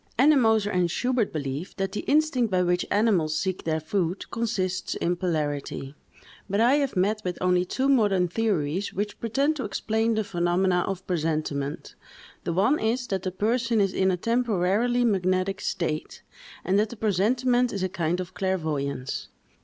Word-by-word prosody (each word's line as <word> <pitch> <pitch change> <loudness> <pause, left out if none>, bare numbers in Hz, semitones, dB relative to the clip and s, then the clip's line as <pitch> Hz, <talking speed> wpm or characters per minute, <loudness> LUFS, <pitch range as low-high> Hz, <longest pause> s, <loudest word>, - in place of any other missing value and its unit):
Ennemoser 225 -7 +4
and 180 -1 +2
Schubert 245 +3 0
believe, 145 +2 -4
that 195 -1 -2
the 210 - -3
instinct 285 -6 +2
by 185 -2 +2
which 180 0 0
animals 185 -8 +2
seek 185 +1 -2
their 160 -1 0
food, 175 +3 -2
consists 195 -6 -2
in 175 +1 0
polarity, 145 -5 -3 0.6
but 200 +2 0
I 245 +5 +5
have 280 -5 -1
met 205 +4 +1
with 180 -1 -3
only 180 0 +2
two 265 +8 -1
modern 205 -9 +3
theories 185 -3 -1
which 205 +2 -3
pretend 275 +7 0
to 265 - -3
explain 225 +1 0
the 220 - +1
phenomena 180 -1 +1
of 190 -1 -4
presentiment; 155 -4 -2 0.5
the - - 0
one 205 - +3
is, 235 +3 0
that 195 -3 -1
the 185 - -3
person 230 +4 +1
is 195 -2 +2
in 190 0 +2
a 180 - +1
temporarily 230 +2 +1
magnetic 185 -2 +1
state, 155 -3 -3 0.4
and 190 +3 +3
that 215 +1 +1
the 235 - -9
presentiment 240 +5 +2
is 195 -2 -3
a - - +2
kind 175 -1 -1
of 180 -1 -6
clairvoyance. 155 -9 -2
190 Hz, 165 wpm, -26 LUFS, 175-225 Hz, 0.6 s, I